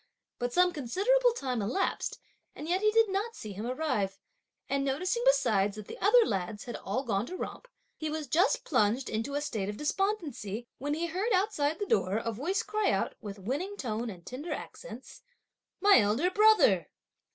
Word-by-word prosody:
But 245 0 -1
some 360 +4 +3
considerable 410 - +2
time 255 - -2
elapsed, 245 - -1 0.4
and 300 - -7
yet 365 +3 +1
he 425 - +4
did 450 +1 +4
not 410 +4 -2
see 215 - -7
him 210 +5 -5
arrive; 255 -8 -1 0.5
and 275 0 0
noticing 365 - 0
besides 210 - +3
that 215 -1 -8
the - - -9
other 450 +4 +6
lads 195 +1 -3
had 240 - -6
all 260 - -3
gone 215 -2 -1
to 370 - -6
romp, - - -6 0.3
he 310 - -3
was 310 0 -3
just 375 - +2
plunged 250 -1 +1
in 220 +1 -1
a 290 +1 -1
state 215 -9 -3
of 210 - -5
despondency, 295 - -2
when 290 +2 -1
he 335 +2 -1
heard 375 +8 -2
outside 365 -6 +1
the 410 - -2
door 195 - +1
a 230 +1 -2
voice 310 - -1
cry 425 0 0
out, - - 0
with 205 -1 -7
winning 290 - -3
tone, 230 - -3
and 175 -5 -10
tender 285 +7 -6
accents: - - -8 0.6
"My 405 -7 +7
elder 225 - +2
brother!" 410 - +5
290 Hz, 185 wpm, -30 LUFS, -, 0.6 s, My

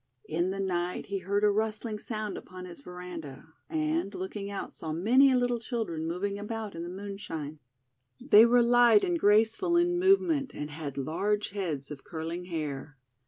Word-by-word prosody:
In 170 +3 0
the 195 +1 -3
night 180 -2 -1
he 195 0 -3
heard 200 +3 -1
a 210 - +5
rustling 215 +1 -2
sound 215 -2 -4
upon 185 0 -9
his 175 -5 -11
veranda, 165 -4 -9 0.2
and, 315 -6 0
looking 195 +2 -5
out, 200 - -5
saw 160 - -5
many 250 - +5
little 245 -1 +1
children 215 -9 -3
moving 200 +4 -2
about 215 0 -5
in 165 - -6
the 170 - -5
moon 200 +2 -6
shine. 155 -6 -6 0.6
They 220 +3 +7
were 240 0 +5
light 235 -2 +6
and 350 -2 0
graceful 225 - +3
in 350 0 +2
move 385 +2 +6
ment, 300 -7 -1
and 150 0 -5
had 145 -2 -6
large 200 +9 -1
heads 160 -9 -3
of 140 -2 -8
curling 165 +2 -5
hair. 150 -4 -5
200 Hz, 175 wpm, -29 LUFS, 165-230 Hz, 0.6 s, They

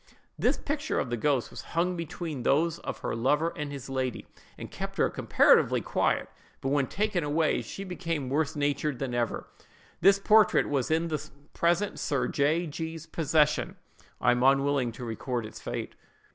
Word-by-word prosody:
"The - - +3
picture 295 +1 -1
of 125 - -3
the - - +1
ghost 130 +1 0
was - - -7 0.2
hung 180 +2 +2
between 165 -4 -5
those 160 +7 +2
of - - -5
her - - -2
lover 150 +8 +1
and 150 -2 -4
his 140 -3 -7
lady, 130 -2 -2 0.3
and - - -8
kept - - -6
her - - +2
comparatively - - +4
quiet; - - 0 0.3
but 135 - -2
when 140 -1 +2
taken 205 -4 -1
away, 155 +2 +1
she 195 - -7
became 165 -6 -3
worse 150 +3 0
natured 145 -1 0
than 130 -1 -3
ever. 120 -1 -1 0.5
This 195 +1 +6
portrait 215 0 +4
was 140 -4 0
in 165 +1 +1
the 155 -2 -4 0.2
present 175 +4 +1
Sir 140 -3 0
J—— 155 +5 +1
G——'s 160 +1 -5
possession. 155 -2 +1 0.4
I 125 - +4
am 125 0 +1
unwilling 135 -1 +3
to 125 +2 -7
record 120 +1 -3
its 110 - -10
fate. - - -5
150 Hz, 170 wpm, -28 LUFS, 135-170 Hz, 0.5 s, This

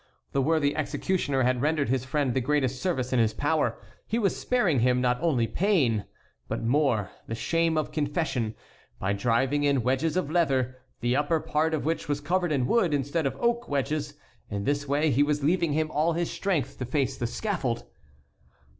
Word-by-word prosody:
The 135 - +1
worthy 145 0 +2
executioner 155 -3 0
had 125 0 +1
rendered 150 -1 +1
his 130 0 0
friend 135 -2 0
the 130 - +1
greatest 130 -1 0
service 130 -9 -1
in 125 - +3
his 110 -2 +2
power: 150 +3 +1 0.3
he 225 - 0
was 205 -5 +1
sparing 200 - +1
him 125 +1 +3
not 125 0 +1
only 145 -9 +2
pain, 135 - +1 0.4
but - - -3
more, 120 -5 +1 0.2
the 115 - -3
shame 165 +6 +1
of 155 - -1
confession, 145 -7 -1 0.4
by 95 +2 -1
driving 125 +7 +1
in 140 -4 +2
wedges 135 +7 +1
of 170 -5 -1
leather, 135 -7 +1 0.3
the 120 +2 +1
upper 150 +3 +1
part 160 +1 0
of 150 - -4
which 165 -1 -2
was 145 -1 0
covered 175 +4 0
with 145 -4 +1
wood, 170 - +2
instead 145 +2 0
of - - -4
oak 235 0 0
wedges. 145 +2 -1 0.3
In 100 -1 -3
this 145 +3 -1
way 145 +2 +2
he 135 +3 +3
was 145 0 +1
leaving 165 0 +2
him 155 +1 0
all 155 +3 +1
his 170 +1 -1
strength 185 -8 -2
to 125 - -2
face 135 +2 0
the 120 - -2
scaffold. 130 - -2
145 Hz, 190 wpm, -27 LUFS, 130-160 Hz, 0.4 s, in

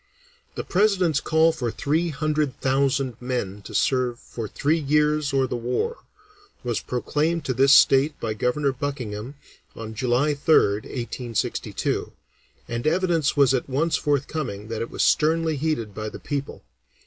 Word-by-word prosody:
The - - -3
President's 185 -6 +2
call 160 +2 +3
for 130 -7 -3
three 160 +8 0
hundred 150 -2 -1
thousand 135 -2 0
men 120 -6 -3
to - - -10
serve 125 -2 +1
"for 115 -2 -7
three 150 +9 0
years 150 0 +1
or 135 -1 +2
the 125 - -3
war" 125 - -2 0.7
was 120 -2 -1
proclaimed 155 +6 -1
to 130 - 0
this 135 +2 +4
state 140 +1 +5
by 110 -1 -2
Governor 135 +6 0
Buckingham 130 -3 -5 0.4
on 110 -1 -7
July 125 +5 +1
3rd 125 -8 +3
(1862), 120 -2 -3 0.5
and 120 +3 -3
evidence 165 -3 +1
was 135 -2 +5
at 130 +1 -1
once 155 +5 +1
forthcoming 140 -7 -2
that 115 -1 -3
it 115 - -3
was - - -1
sternly 160 +1 +2
heeded 140 -8 -2
by 110 +1 -4
the - - -9
people. 140 -2 -5
135 Hz, 150 wpm, -24 LUFS, 120-155 Hz, 0.7 s, state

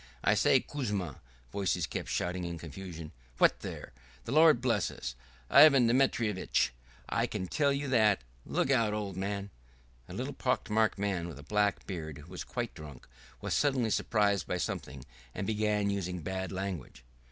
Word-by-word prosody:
"I - - +4
say, - - +4
Kuzma!" 105 - -4 0.3
voices 100 -2 0
kept - - -5
shouting 90 +1 -1
in 85 -1 -4
confusion. 85 -1 -8 0.3
"What - - +4
there!" - - -7 0.3
"The - - -5
Lord 155 -2 +6
bless 125 -2 +1
us!" - - -6 0.3
"Ivan 140 - +8
Dementyitch, 115 - +2 0.4
I - - 0
can 95 - -3
tell 140 - +1
you 140 +1 -1
that!" 110 - +3 0.2
"Look 135 - 0
out, 115 -5 +3
old 100 -3 -3
man!" 100 +1 -3 0.6
A - - -7
little - - -3
pock - - -1
marked 110 0 +2
man 95 -4 -1
with 80 -5 -8
a 70 - -11
black 105 +6 +1
beard, 80 -6 -5
who 75 +4 -13
was 90 - -5
quite 120 -2 -4
drunk, 75 -5 -11 0.3
was - - -2
suddenly 130 -6 +2
surprised 105 -4 +1
by 90 - -1
something 65 -6 -4 0.3
and 100 - -3
began 105 -1 +1
using 90 -3 -3
bad 95 +2 -3
language. 95 -10 -5
100 Hz, 165 wpm, -31 LUFS, 90-115 Hz, 0.6 s, Ivan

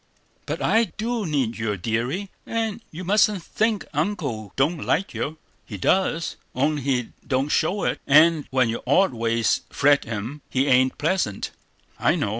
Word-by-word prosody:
"But - - -3
I 230 +1 +4
do 225 -2 -2
need 130 -7 -1
you, 105 -2 -1
deary; 120 - -2 0.2
and 225 -1 -2
you 170 +4 -8
mustn't 205 0 +3
think 220 +1 0
Uncle 145 - -2
don't 150 +4 +1
like 195 +4 0
you. 155 +2 -3 0.3
He 105 - -8
does, 165 - +1 0.2
only 145 +3 +1
he 125 -3 0 0.2
don't 135 +1 0
show 195 +6 +1
it; - - -1
and 155 +1 +5
when 130 -2 +2
your 115 - -3
odd 185 +4 +4
ways 115 -1 +1
fret 145 0 +3
him, 115 +6 -5
he 130 +1 +1
ain't 130 -1 +3
pleasant, 155 - -1 0.5
I - - +3
know. - - -1
145 Hz, 160 wpm, -24 LUFS, 120-190 Hz, 0.5 s, and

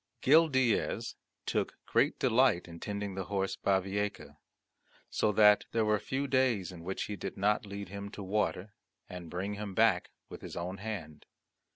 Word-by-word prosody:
Gil 160 +5 +6
Diaz 130 -6 +1 0.3
took - - -1
great - - +2
delight 115 -7 +3
in 85 -1 -10
tending 100 0 -4
the 95 -1 -4
horse 95 0 -1
Bavieca, 100 +1 -1 0.7
so 105 - +2
that 105 0 +6
there 115 -1 +2
were 105 -1 +2
few 135 +7 -2
days 130 -9 +1
in 85 -2 -10
which 95 +2 -3
he 105 - -4
did 90 - -6
not 105 +2 +1
lead 100 -1 -6
him 100 +1 -6
to 100 - -8
water, 105 0 -1 0.3
and 90 -2 -8
bring 95 +4 -3
him 100 -2 -6
back 110 -5 +3 0.2
with - - -10
his - - -8
own 90 +3 -4
hand. 95 -8 -6
100 Hz, 170 wpm, -31 LUFS, 95-110 Hz, 0.7 s, Gil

